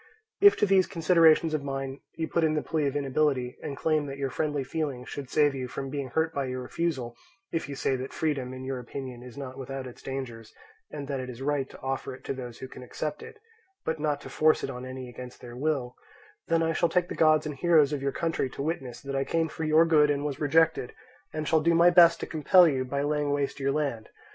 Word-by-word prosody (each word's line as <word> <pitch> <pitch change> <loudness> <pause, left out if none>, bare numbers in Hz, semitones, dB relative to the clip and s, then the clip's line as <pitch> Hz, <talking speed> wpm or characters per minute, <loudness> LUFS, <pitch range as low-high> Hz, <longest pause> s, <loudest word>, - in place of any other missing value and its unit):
"If 405 0 +7
to - - +3
these 190 -2 +4
considerations 165 -1 +4
of 150 -2 -1
mine 135 0 -4 0.2
you 160 0 -2
put 170 - 0
in 155 -1 +2
the 150 - -1
plea 155 -3 0
of 140 - -3
inability, 135 -3 0
and 140 - -5
claim 155 -2 +1
that 135 0 -6
your 135 -1 -2
friendly 150 -1 -1
feeling 135 -3 -3
should 140 -1 -7
save 150 -2 +3
you 130 -2 -4
from 135 +2 -5
being 140 -2 -3
hurt 160 +4 0
by 140 -1 -1
your 130 0 -4
refusal; 130 -6 -2 0.4
if 165 -4 -2
you 140 - -5
say 135 - 0
that 130 +1 -5
freedom, 140 -5 -2
in 130 0 -7
your 130 -1 -3
opinion, 125 0 -7
is 125 0 -11
not 135 -1 -7
without 135 0 -5
its 125 - -10
dangers, 120 -5 -6 0.3
and 145 -2 -6
that 135 -1 -2
it 130 0 -5
is 125 +1 -7
right 140 -1 0
to - - -13
offer 135 -1 -3
it - - -17
to - - -3
those 125 -3 -7
who 130 - -7
can - - -11
accept 150 +4 -5
it, - - -11 0.5
but 160 -1 -1
not 150 -1 0
to - - -9
force 155 0 +3
it - - -2
on 125 +1 -7
any 130 0 -7
against 125 0 -10
their 120 -1 -10
will, 130 -3 -1 0.5
then 165 0 +2
I 165 0 +1
shall 170 +1 +2
take 180 -1 +1
the - - -5
gods 155 -1 +4
and 150 - -3
heroes 150 0 +4
of 145 - -2
your 140 0 0
country 165 -5 -1
to 135 - -5
witness 135 -6 -4
that 140 0 -5
I 135 - +1
came 165 +2 0
for 160 - -4
your 155 +2 +5
good 150 -3 +4
and 145 0 0
was 145 -1 -3
rejected, 160 -2 +2 0.4
and 155 -1 -4
shall 160 -1 +3
do 170 +2 +3
my 170 +1 +6
best 175 -1 +7
to - - -2
compel 175 +3 +5
you 135 -4 0
by 140 +2 -2
laying 150 0 0
waste 145 0 -1
your 140 0 +1
land. 135 -7 -2
140 Hz, 245 wpm, -28 LUFS, 130-155 Hz, 0.5 s, If